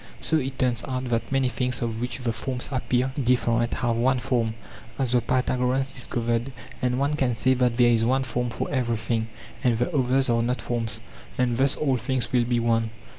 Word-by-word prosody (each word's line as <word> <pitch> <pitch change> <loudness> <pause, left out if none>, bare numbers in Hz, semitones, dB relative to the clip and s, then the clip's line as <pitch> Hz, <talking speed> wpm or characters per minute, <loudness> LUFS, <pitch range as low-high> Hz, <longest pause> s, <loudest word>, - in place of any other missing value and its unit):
Soit 135 -4 0
turns 120 -3 +1
out 130 -1 -3
that 115 +1 -1
many 135 -1 +2
things 125 -1 -1
of 115 -1 -3
which 125 - -2
the 125 -3 -2
forms 125 +2 -3
appear 130 0 0
different 120 -1 +2
have 120 -2 0
one 130 +3 +3
form, 115 -3 0 0.4
as 130 -3 0
the 125 -1 +3
Pytha 130 +1 0
goreans 130 +2 0
discovered; 120 0 -1 0.3
and 125 -1 +1
one 140 +2 +1
can 130 -5 +1
say 130 +3 +3
that 125 -2 +1
there 120 -1 +5
is 115 -1 +3
one 130 +3 +2
form 125 -2 -2
for - - -3
everything, 115 -3 -1 0.4
and 120 -3 +3
the 125 +8 -1
others 130 0 +2
are 115 -1 +2
not 125 +2 0
forms; 115 -2 -2 0.4
and 125 -2 +1
thus 135 +3 +2
all 135 -4 +1
things 125 +1 -2
will 120 -1 +3
be 120 0 +1
one. 115 -1 +1
125 Hz, 200 wpm, -25 LUFS, 115-130 Hz, 0.4 s, there